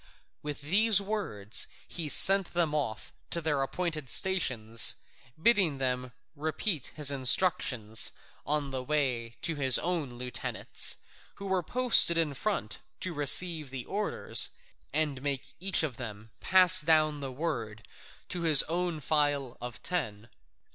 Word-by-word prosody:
With 150 -1 -7
these 200 +7 +3
words 195 - -1 0.2
he 165 -4 -5
sent 195 +3 +5
them 165 -3 0
off 130 -8 -5 0.2
to 170 - +1
their 150 -4 -2
appointed 155 -1 -4
stations, 120 - +2 0.4
bidding 185 -7 +2
them 125 -1 -3 0.2
repeat 155 - -3
his 150 -2 +4
instructions 130 - +2 0.3
on 145 -2 -2
the 130 -1 -5
way 125 -5 -2
to 165 - +1
their 135 -3 -3
own 165 -7 -3
lieutenants, 125 -1 0 0.4
who 200 - -10
were 190 -1 -1
posted 240 -4 +5
in 160 -3 -1
front 130 - -4 0.2
to 185 - -4
receive 155 +1 +2
the 130 -2 -7
orders, 210 +1 0 0.4
and 150 -4 -1
make 135 -2 -4
each 190 -1 0
of 135 -7 -5
them 110 -3 -10
pass 185 -1 +5
down 155 -1 +1
the 135 -2 -7
word 115 - -6 0.4
to 180 - -5
his 155 -4 +7
own 170 -1 -4
file 145 -4 -1
of 120 0 -9
ten. 115 - -3
150 Hz, 135 wpm, -28 LUFS, 130-175 Hz, 0.4 s, his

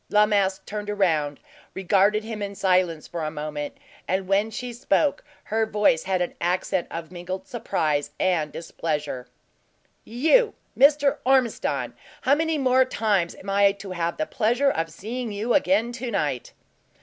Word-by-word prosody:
La 210 0 +5
Masque 195 -2 +1
turned 210 0 -5
round, 160 -8 +1 0.4
regarded 195 +3 +2
him 220 -1 -6
in 200 0 -4
silence 180 -5 +1
for 170 -2 -5
a 155 - -1
moment, 150 -1 -5 0.3
and 190 0 -1
when 200 +3 +2
she 245 +2 -5
spoke, 275 +4 +1 0.2
her 220 +1 0
voice 210 -6 +2
had 185 -1 +1
an 175 - -5
accent 180 +1 0
of 165 0 -6
mingled 185 +1 -6
surprise 155 -10 -1
and 165 -5 +1
displeasure. 150 -6 -4 0.8
"You, 320 - +3 0.2
Mr. 285 +1 +4
Ormiston! 260 -3 +1 0.3
How 270 - +4
many 320 +1 +1
more 260 -2 +4
times 210 -8 0
am 195 - -7
I 200 0 +4
to 200 -1 -9
have 170 -2 -2
the 310 - 0
pleasure 245 +2 +1
of 165 0 -2
seeing 225 +8 -5
you 215 +4 -1
again 280 -5 +2
to 245 0 -5
night?" 145 - -2
200 Hz, 155 wpm, -24 LUFS, 170-240 Hz, 0.8 s, La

